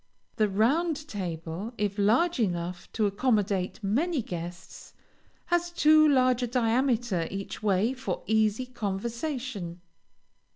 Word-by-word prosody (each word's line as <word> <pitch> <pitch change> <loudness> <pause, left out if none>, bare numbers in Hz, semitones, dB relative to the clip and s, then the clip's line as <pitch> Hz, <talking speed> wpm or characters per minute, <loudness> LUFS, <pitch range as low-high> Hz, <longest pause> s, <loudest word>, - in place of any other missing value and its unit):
The 215 -2 +3
round 295 - +1
table, 180 - -5
if 205 0 -1
large 250 +11 +3
enough 175 -4 -2
to 220 - +1
accommodate 200 -3 0
many 275 - 0
guests, 175 -1 -8 0.5
has 345 0 +1
too 310 -2 +5
large 255 -2 +3
a 245 - 0
diameter 235 -6 +1
each 195 0 -6
way 210 +3 +2
for 265 0 -4
easy 220 +2 +2
conversation. 235 - -4
220 Hz, 115 wpm, -28 LUFS, 195-260 Hz, 0.5 s, too